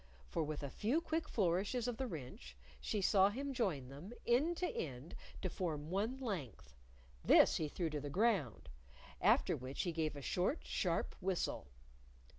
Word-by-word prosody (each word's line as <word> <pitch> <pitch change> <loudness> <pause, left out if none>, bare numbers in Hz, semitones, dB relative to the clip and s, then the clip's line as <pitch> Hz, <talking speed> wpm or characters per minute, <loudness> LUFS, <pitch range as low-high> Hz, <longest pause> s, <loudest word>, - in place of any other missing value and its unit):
For 165 - -2
with 150 -1 -4
a 140 - -3
few 240 +10 +1
quick 325 -1 -2
flourishes 200 +5 +1
of 245 -2 -2
the 265 - -2
wrench, 125 - -8 0.2
she 210 -3 -1
saw 195 0 +5
him 275 +6 -3
join 175 - -1
them, 150 - -9
end 290 +9 +3
to 360 - 0
end, 135 - -5 0.3
to - - +1
form 160 -4 -3
one 215 +7 0
length. 160 - -5 0.5
This - - +6
he 155 - -1
threw 165 +1 -2
to 150 -1 -2
the 145 - -4
ground, 185 - +1 0.5
after - - +4
which 130 +2 -4
he 175 - -1
gave 160 -2 -1
a 145 - -6
short, 185 - 0
sharp - - 0
whistle. 185 -1 -1
185 Hz, 170 wpm, -37 LUFS, 145-235 Hz, 0.5 s, This